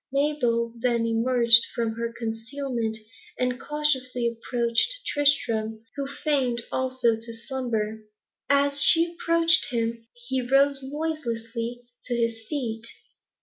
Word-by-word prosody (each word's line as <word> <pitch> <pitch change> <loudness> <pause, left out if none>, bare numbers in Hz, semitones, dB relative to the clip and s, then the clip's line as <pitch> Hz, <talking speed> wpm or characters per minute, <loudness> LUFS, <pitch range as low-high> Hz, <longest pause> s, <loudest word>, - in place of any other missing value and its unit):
Mabel 245 -5 +1
then 235 -1 +1
emerged 230 0 +5
from 230 -2 0
her 230 +1 -3
concealment, 230 0 -3 0.4
and 250 0 -1
cautiously 260 -5 0
approached 235 - 0
Tristram, 225 -7 +1
who 280 -1 -3
feigned, 270 -5 0
also, 255 -3 +1
to 230 +1 -7
slumber. 225 -5 -2 0.5
As 280 0 +4
she 335 +1 +5
approached 335 -1 +3
him, 230 -1 -2
he 245 +2 -2
rose 275 +2 +3
noiselessly 245 -5 -4 0.2
to 245 - -2
his 230 -1 -2
feet. 230 -6 -3
245 Hz, 110 wpm, -25 LUFS, 230-280 Hz, 0.5 s, emerged